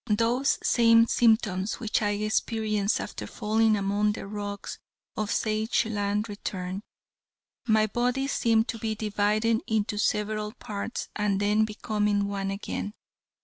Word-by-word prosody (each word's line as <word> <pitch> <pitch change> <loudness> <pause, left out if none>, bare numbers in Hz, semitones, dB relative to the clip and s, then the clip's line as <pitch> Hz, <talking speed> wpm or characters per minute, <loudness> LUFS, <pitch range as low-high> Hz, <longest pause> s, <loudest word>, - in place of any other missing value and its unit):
Those 230 +5 +2
same 230 -1 +5
symptoms 220 -5 +2
which 225 -2 0
I 210 - +1
experienced 215 0 0
after - - -6
falling 220 0 +2
among 205 +1 +1
the - - -7
rocks 205 0 -6 0.4
of 215 -2 -2
Sageland 215 -1 0
returned. 190 -2 -5 0.9
My 220 -1 +4
body 245 +5 0
seemed 230 -4 +2
to 230 - -3
be 220 -1 -2
dividing 215 +2 +1
into 210 -1 0
several 210 0 0
parts 215 -1 -5
and 205 -2 0
then 210 +2 +3
becoming 210 -1 0
one 195 -1 -2
again. 200 +1 -4
215 Hz, 125 wpm, -27 LUFS, 205-225 Hz, 0.9 s, same